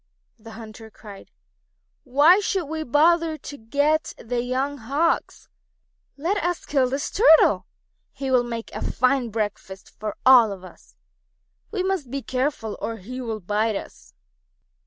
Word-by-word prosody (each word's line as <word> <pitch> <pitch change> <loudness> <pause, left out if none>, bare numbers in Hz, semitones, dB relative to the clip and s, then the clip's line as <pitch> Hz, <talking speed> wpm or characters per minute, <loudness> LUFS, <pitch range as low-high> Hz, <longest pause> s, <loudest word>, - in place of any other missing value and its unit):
The 225 0 -12
hunters 220 0 -11
cried: 200 -2 -12 0.8
"Why 290 +9 +5
should 385 -3 -1
we 315 +2 -4
bother 315 +3 +2
to 290 - -9
get 285 +7 0
the 240 +1 -3
young 265 +3 -2
Hawks? 280 +9 -1 0.7
Let 345 +8 -1
us 350 0 -2
kill 265 -3 +1
this 275 +2 -3
Turtle. 385 -7 +5 0.4
He 270 -1 -5
will 250 -1 +4
make 235 -1 -6
a - - -5
fine 255 -1 +1
breakfast 205 -3 -5
for 215 -1 -4
all 250 -4 +7
of 190 -2 -8
us. 185 - -16 0.7
We 395 -4 -2
must 375 -9 -2
be 275 +1 -4
careful 255 -4 -2
or 230 - -3
he 250 +6 -8
will 225 -3 -4
bite 210 +4 0
us. - - -9
255 Hz, 145 wpm, -23 LUFS, 225-305 Hz, 0.8 s, all